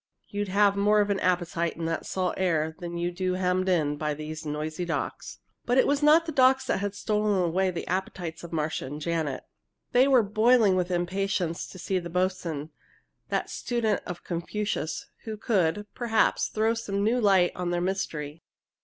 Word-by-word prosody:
You'd 205 0 -2
have 200 +1 +3
more 205 +1 +3
of 205 0 +2
an 195 - 0
appetite 175 -2 0
in 165 - -3
that 165 - -2
salt 185 -1 -1
air 160 -4 0
than 175 -1 -5
you 175 +1 -1
do 185 +1 -1
hemmed 185 0 0
in 150 -5 +1
by 150 0 -2
these 155 +1 -6
noisy 155 +3 -3
docks!" 170 -2 -4 0.3
But 245 +1 +1
it - - +6
was 285 +1 +1
not 310 +3 +6
the 325 - -3
docks 265 -1 +4
that - - 0
had 205 0 -3
stolen 210 -2 +1
away 185 +2 +1
the 175 -2 -4
appetites 175 -3 -3
of 170 - -8
Marcia 155 -4 -2
and 145 +3 -6
Janet. 155 -4 -2 0.5
They 255 +2 +5
were 260 -4 +5
boiling 215 0 +4
with 180 -1 0
impatience 180 -1 -1
to - - -11
see 185 +1 -1
the 170 -1 -7
boatswain, 170 -4 -2 0.6
that - - -1
student 225 -4 -1
of 175 -1 -6
Confucius, 175 -1 -3 0.2
who 220 -1 -5
could, 205 -3 +1
perhaps, 230 -2 +1
throw 220 +1 +1
some 200 -3 -2
new 240 +4 +2
light 190 -4 +4
on 180 -1 -2
their 175 0 0
mystery. 165 -5 -3
185 Hz, 185 wpm, -27 LUFS, 170-210 Hz, 0.6 s, it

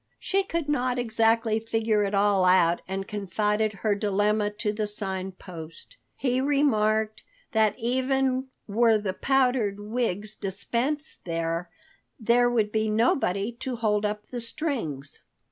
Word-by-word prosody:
She 390 +1 +1
could 335 -5 -3
not 255 -4 0
exactly 225 -1 +2
figure 225 -1 +1
it 200 0 -1
all 200 -1 +3
out 180 -2 +4
and 195 +1 -4
confided 210 +2 0
her 210 - +4
dilemma 205 +1 +1
to 210 0 -2
the 210 0 -2
Sign 190 -2 -1
Post. 170 - -10 0.2
He 255 -1 0
remarked 220 -7 +2 0.3
that 220 -2 +2
even 260 +2 0 0.2
were 225 +1 +4
the 205 -3 -3
powdered 250 -4 +1
wigs 210 -2 -2
dispensed 240 +10 -3
with, 165 +1 -1 0.5
there 240 +2 +3
would 220 -3 +1
be 220 0 0
nobody 215 -2 +1
to 260 -2 -3
hold 215 -2 +1
up 210 0 -2
the 245 +1 -6
strings. 230 - -4
215 Hz, 135 wpm, -26 LUFS, 200-245 Hz, 0.5 s, out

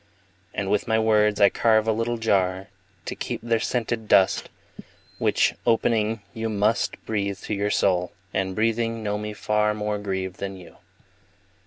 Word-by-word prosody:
And 100 +1 -3
with 105 - +1
my 110 -1 +2
words 105 -1 +3
I 100 - +7
carve 110 -1 +2
a - - +4
little 115 +2 -1
jar 95 -4 0 0.4
To - - -3
keep - - -4
their 115 -1 +1
scented 115 -1 -2
dust, 95 -2 +3 0.7
Which, - - +2
opening, 115 -2 +1
you 115 0 -3
must 105 +2 +1
Breathe 100 -3 -2
to - - -4
your 100 0 0
soul, 90 -3 +1 0.2
and, 95 -1 -1
breathing, 115 0 0
know 105 0 -1
me 105 0 -5
far 105 +1 +1
More 105 0 -2
grieved 95 -2 -3
than 95 -1 -5
you. 90 -2 -14
105 Hz, 160 wpm, -24 LUFS, 100-110 Hz, 0.7 s, I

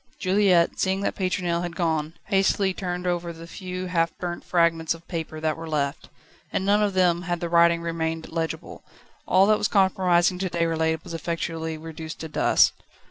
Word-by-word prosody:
Juliette, 185 -3 +3
seeing 190 +1 +1
that - - -1
Pétronelle 180 -3 -1
had 175 -1 -5
gone, 160 -2 -1
hastily 195 -1 +2
turned 180 -1 -4
over 175 -1 -1
the 165 0 -10
few 185 +1 -6
half 170 -2 0
burnt 175 -1 -5
fragments 170 -2 +1
of 165 0 -17
paper 160 -3 -5
that 155 -1 0
were 165 0 -8
left. 140 -2 -2 0.4
In 190 - -1
none 205 +1 +3
of 205 -2 0
them 175 -2 +3
had 175 -1 -2
the 170 - -3
writing 170 0 +4
remained 165 -1 -3
legible. 165 0 -4 0.5
All 185 +2 +5
that 215 +1 +3
was 210 - +1
compromising 185 -2 +3
to 190 -1 -1
Déroulède 160 -1 0
was - - -9
effectually 165 -1 -3
reduced 160 0 -8
to 160 - -4
dust. 155 - +3
170 Hz, 180 wpm, -25 LUFS, 165-185 Hz, 0.5 s, All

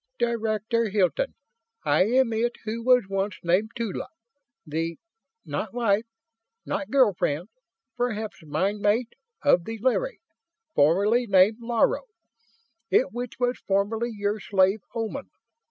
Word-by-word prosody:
"Director 230 -1 0
Hilton, 205 - +1 0.5
I - - +4
am 245 +1 +3
it 235 +2 0
who 225 +1 -3
was 250 -1 +5
once 195 +1 -1
named 180 +6 +2
Tula, 230 -5 -3 0.6
the 165 +2 -3 0.5
not - - -4
wife, 225 -2 +1 0.6
not 290 - -3
girl 255 -7 +4
friend, 165 0 -1 0.5
perhaps 220 -3 -3
mind 185 +8 -1
mate? 220 +4 +1 0.3
of 180 -12 +4
the 225 0 -5
Larry, 260 - 0 0.5
formerly 205 +11 +3
named 195 +2 +5
Laro, 235 - +1 0.8
it - - +3
which 245 0 -5
was 245 0 0
formerly 205 +4 0
your 205 0 -2
slave 195 +1 +2 0.2
Oman. 230 +5 -4
220 Hz, 120 wpm, -26 LUFS, 195-240 Hz, 0.8 s, was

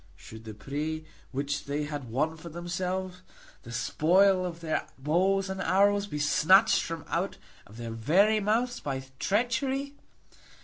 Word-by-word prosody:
Should 110 0 -12
the 110 -1 -8
prey 150 +8 -4 0.3
which 140 +2 -2
they 145 +1 -2
had 145 -4 -5
won 150 +7 0
for 160 +1 -10
themselves, 180 +2 -4 0.4
the 120 - -11
spoil 185 +10 +3
of 170 -1 -7
their 160 -2 -2
bows 185 +7 +1
and 190 0 -4
arrows, 200 +2 +3
be 150 - -5
snatched 185 +8 +5
from 165 -2 -5
out - - -2 0.3
of 105 - -14
their 115 -1 -5
very 185 - +3
mouths 235 +4 0
by 135 -2 -4 0.2
treachery? 260 +6 0
170 Hz, 145 wpm, -28 LUFS, 145-195 Hz, 0.4 s, snatched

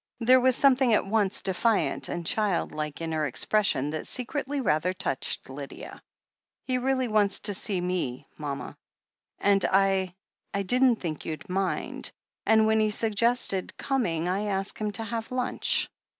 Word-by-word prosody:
There 255 +2 +6
was 255 0 +3
something 260 -4 +4
at - - +1
once 205 -1 0
defiant 205 +3 +1
and 175 -1 -4
childlike 165 -7 -1
in 165 0 -3
her 155 -1 0
expression 150 - +1
that 155 - -5
secretly 275 +3 -3
rather 180 - +1
touched 135 -7 -2
Lydia. 135 +1 -9 0.6
"He 255 -1 0
really 260 0 0
wants 210 -3 +2
to 205 - +1
see 190 0 -2
me, 175 -9 -3
mama, 145 -2 -5 0.6
and 200 -1 +3
I 190 -2 +2 0.2
— 200 - -51
I 200 - 0
didn't 250 +5 +4
think 165 -7 -5
you'd 155 -1 -6
mind, 190 +1 -2 0.4
and 220 0 +5
when 220 0 +3
he 215 0 +2
suggested 220 -2 +1
coming, 175 -12 -1
I 195 +3 -1
asked 195 -1 -2
him 210 -1 -1
to 225 - -3
have 225 +1 -5
lunch. 255 -1 +3
200 Hz, 155 wpm, -27 LUFS, 175-230 Hz, 0.6 s, There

